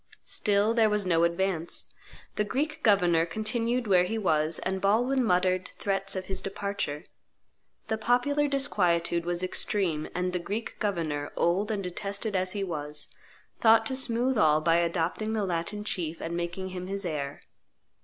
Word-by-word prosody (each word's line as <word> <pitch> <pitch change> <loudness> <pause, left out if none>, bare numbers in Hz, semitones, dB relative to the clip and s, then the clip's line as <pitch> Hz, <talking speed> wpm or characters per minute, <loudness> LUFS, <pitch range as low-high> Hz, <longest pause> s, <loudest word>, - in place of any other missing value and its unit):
Still 205 +1 +2
there 225 -2 +4
was 210 -1 0
no 170 -2 +3
advance; 170 -1 0 0.4
the 210 - +1
Greek 300 +8 -2
governor 180 -6 +4
continued 230 +6 -1
where 180 -3 +4
be 225 - -2
was; 155 -5 +1
and 190 0 -3
Baldwin 245 +7 +2
muttered 185 -2 +1
threats 195 -1 0
of 185 0 -3
his 190 0 -2
departure. 195 -6 -3 0.8
The 220 -1 -1
popular 250 +6 +2
disquietude 175 -12 +1
was 175 +1 -1
extreme; 180 -4 -1
and 180 0 -1
the 180 - 0
Greek 210 +6 -5
governor, 160 -8 -2
old 190 +5 +1
and 205 -3 -2
detested 200 +3 -4
as 185 0 0
he 200 -1 -2
was, 150 -4 -4 0.5
thought 225 0 +5
to 260 - -1
smooth 250 -1 +1
all 155 -3 +5
by 165 +1 +3
adopting 170 +5 0
the 215 -2 0
Latin 180 +4 -3
chief 170 -5 -3
and 170 +1 -4
making 175 +2 -3
him 180 0 -6
his 195 0 -3
heir. 145 -4 -3
190 Hz, 160 wpm, -28 LUFS, 170-215 Hz, 0.8 s, thought